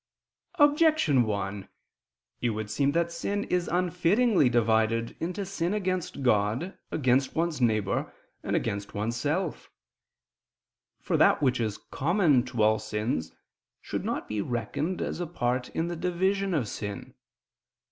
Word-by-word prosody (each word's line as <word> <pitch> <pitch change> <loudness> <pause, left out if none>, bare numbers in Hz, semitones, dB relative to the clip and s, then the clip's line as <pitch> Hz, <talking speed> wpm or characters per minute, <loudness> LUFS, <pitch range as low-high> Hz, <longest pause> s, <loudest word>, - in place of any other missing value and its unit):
Objection 295 - +4
1: 100 -2 -3 0.7
It 120 - +1
would 110 -1 -4
seem 140 +5 +2
that 170 +1 +1
sin 200 +5 -2
is 180 -1 -1
unfittingly 180 - +2
divided 115 -1 +1
into 185 +4 -3
sin 180 0 -2
against 185 -7 -2
God, 115 - +1
against 130 -2 +1
one's 165 -3 -1
neighbor, 110 -4 +1 0.3
and - - -2
against 100 0 -2
oneself. 145 - -2 1.3
For - - 0
that - - +4
which 130 -3 +2
is 110 -3 -1
common 160 -3 +2
to 120 -4 -1
all 110 0 +4
sins 105 -5 -2 0.5
should - - -4
not - - -3
be 105 -1 -2
reckoned 135 - -2
as - - -4
a 175 - -2
part 125 -5 -1
in 165 - -2
the 175 - -3
division 190 +2 0
of 130 -8 0
sin. 100 0 -6
140 Hz, 135 wpm, -28 LUFS, 110-180 Hz, 1.3 s, Objection